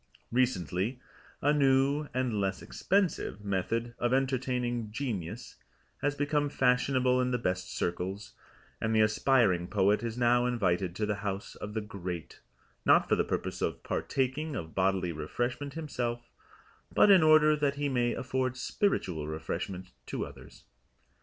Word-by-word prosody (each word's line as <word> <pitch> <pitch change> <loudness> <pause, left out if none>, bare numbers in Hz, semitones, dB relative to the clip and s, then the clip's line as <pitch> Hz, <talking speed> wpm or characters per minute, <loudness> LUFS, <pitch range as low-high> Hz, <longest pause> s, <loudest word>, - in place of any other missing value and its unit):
Recently 120 - 0 0.4
a 145 +1 +4
new 140 +1 +3
(and 125 -5 -1
less 95 0 -2
expensive) 180 - -1
method 115 +5 -1
of 120 +1 +2
entertaining 125 -4 -1
Genius 110 - -5 0.4
has 145 0 0
become 145 0 0
fashionable 125 -1 +2
in 125 - +1
the 125 - +1
best 90 -5 -2
circles, 95 +4 -3 0.5
and 110 0 0
the 110 - +5
aspiring 105 -5 +3
poet 100 +1 +2
is 115 0 -4
now 120 0 +3
invited 95 -7 0
to 105 - -1
the 105 -1 -1
house 100 -1 -4
of 105 +1 -8
the 110 - 0
Great, 90 -5 -6 0.4
not - - +5
for - - +3
the - - +2
purpose - - -3
of - - -2
partaking 140 +3 -1
of 80 -7 -6
bodily 95 -2 +1
refreshment 120 - -3
himself, 120 -7 -4 0.6
but 205 - +6
in 190 -3 +8
order 155 -1 +6
that 145 -2 0
he 145 0 -1
may 120 -3 +1
afford 130 -1 -2
spiritual 95 - -1
refreshment 90 +4 -5 0.2
to - - -3
others. - - -13
120 Hz, 145 wpm, -30 LUFS, 95-135 Hz, 0.6 s, in